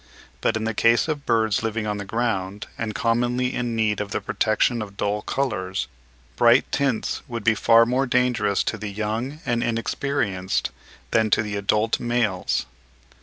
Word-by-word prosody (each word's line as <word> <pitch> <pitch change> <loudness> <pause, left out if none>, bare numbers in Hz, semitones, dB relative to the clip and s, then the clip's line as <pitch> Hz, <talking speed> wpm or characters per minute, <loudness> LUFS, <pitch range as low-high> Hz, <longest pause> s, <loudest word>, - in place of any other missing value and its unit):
But - - +1
in 110 - -3
the 115 0 -1
case 115 +5 +3
of 150 -3 -3
birds 110 -3 +2
living 110 -1 -2
on 105 -1 -2
the 100 - -5
ground 105 -2 -2
and 110 -2 -4
commonly 120 +2 +1
in 120 -2 -2
need 105 -2 +1
of 105 - -4
the - - -1
protection 115 +2 +1
of 100 -2 -8
dull 105 +1 -1
colours, 95 -8 -2 0.5
bright 120 +2 +5
tints 135 -5 0
would 115 -2 -5
be 115 - +4
far 115 +2 +5
more 130 +3 +1
dangerous 125 -5 +2
to 115 - -3
the 105 0 -4
young 110 +8 -3
and 120 0 0
inexperienced 115 -5 -1 0.4
than 110 -1 +3
to 110 - +3
the 105 -1 -4
adult 105 +2 +1
males. 120 -6 0
115 Hz, 170 wpm, -23 LUFS, 105-120 Hz, 0.5 s, bright